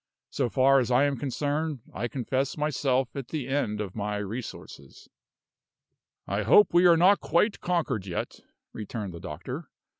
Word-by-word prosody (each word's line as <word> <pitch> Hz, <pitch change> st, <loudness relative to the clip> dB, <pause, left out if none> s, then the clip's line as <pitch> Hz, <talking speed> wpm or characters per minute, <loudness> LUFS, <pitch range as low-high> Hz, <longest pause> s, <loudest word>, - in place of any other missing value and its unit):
So 130 Hz, -4 st, -1 dB
far 135 Hz, +2 st, +4 dB
as 125 Hz, -, -1 dB
I 125 Hz, +2 st, +4 dB
am 145 Hz, -1 st, +1 dB
concerned, 145 Hz, +2 st, -2 dB
I 115 Hz, +5 st, -2 dB
confess 130 Hz, +3 st, -2 dB
myself 135 Hz, -4 st, 0 dB
at 135 Hz, -3 st, -5 dB
the 145 Hz, -4 st, -4 dB
end 135 Hz, -7 st, -1 dB
of 100 Hz, -3 st, -5 dB
my 105 Hz, -1 st, -2 dB
resources." 105 Hz, -, -8 dB, 1.2 s
"I 100 Hz, +2 st, -1 dB
hope 205 Hz, -, +5 dB
we 175 Hz, +1 st, +6 dB
are 170 Hz, -1 st, +6 dB
not 190 Hz, +4 st, +5 dB
quite 200 Hz, +6 st, +1 dB
conquered 150 Hz, -, -1 dB
yet," 85 Hz, -, -4 dB, 0.3 s
returned 105 Hz, -3 st, -6 dB
the 85 Hz, -, -8 dB
doctor. 100 Hz, -, -7 dB
130 Hz, 155 wpm, -27 LUFS, 105-150 Hz, 1.2 s, we